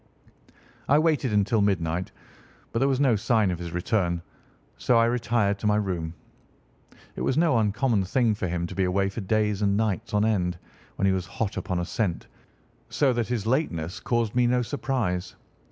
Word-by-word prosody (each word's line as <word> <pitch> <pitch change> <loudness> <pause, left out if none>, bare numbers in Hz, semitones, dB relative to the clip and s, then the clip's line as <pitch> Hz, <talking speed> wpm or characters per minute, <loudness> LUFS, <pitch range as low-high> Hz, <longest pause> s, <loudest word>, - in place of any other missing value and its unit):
I 145 - +6
waited 155 -5 +2
until 105 +2 +2
midnight, 90 -3 0 0.6
but 115 - -1
there 135 - +3
was 135 -2 +1
no 135 -5 +4
sign 110 -2 +2
of 85 - -4
his 85 -1 -6
return, 90 -1 -1 0.5
so 120 - +2
I 115 - +5
retired 115 -4 +1
to 105 - -1
my 105 - +3
room. 90 -6 -2 1.0
It - - -5
was 130 - 0
no 160 -8 +3
uncommon 105 0 +1
thing 115 +2 +2
for 100 -3 -3
him 85 0 -2
to - - -7
be 95 - 0
away 95 +2 +1
for 105 +3 -6
days 105 +1 0
and 100 -1 +2
nights 110 0 -1
on 105 +1 +3
end 90 -5 0 0.4
when - - 0
he 95 - +4
was 90 -2 -2
hot 110 -3 -3
upon 90 -1 -2
a 85 - -1
scent, 95 -2 -2 0.6
so 135 -3 +2
that 120 -2 -1
his 120 -4 -2
lateness 95 - -1
caused 115 0 -1
me 125 0 +3
no 125 0 +2
surprise. 120 -9 -2
105 Hz, 185 wpm, -26 LUFS, 95-120 Hz, 1.0 s, I